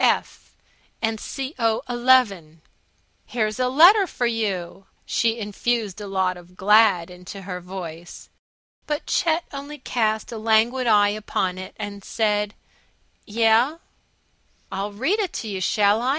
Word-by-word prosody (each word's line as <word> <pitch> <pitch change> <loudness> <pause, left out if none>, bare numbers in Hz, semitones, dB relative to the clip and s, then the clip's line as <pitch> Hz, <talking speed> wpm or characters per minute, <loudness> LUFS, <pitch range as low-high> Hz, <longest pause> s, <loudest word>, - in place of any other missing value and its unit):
F. - - 0 0.5
and 225 -1 -1 0.4
Co. 225 -1 +1
11. 240 -11 +2 0.6
"Here's 215 -1 -2
a 255 - +2
letter 360 +9 +7
for 245 - -2
you!" 195 -5 -2 0.2
She 230 0 +1
infused 215 -1 -2
a 205 - -6
lot 190 -2 0
of 175 +1 -16
Glad 200 -4 +4
into 180 +2 -10
her 180 -1 -6
voice. 175 -2 -8 0.6
But 295 -1 -2
Chet 335 0 +1
only 285 +2 -7
cast 220 -5 -1
a 225 - -5
languid 225 +3 +2
eye 205 -2 +5
upon 195 -3 -2
it 185 - -9
and 200 -1 -6
said, 210 -2 0 0.7
"Yeh?" 230 +7 +3 0.9
"I'll 200 +2 -3
read 270 - 0
it 390 -5 -2
to 225 - -5
you, 195 -3 -4
shall 205 +3 +3
I? 250 - 0
215 Hz, 135 wpm, -23 LUFS, 195-240 Hz, 0.9 s, letter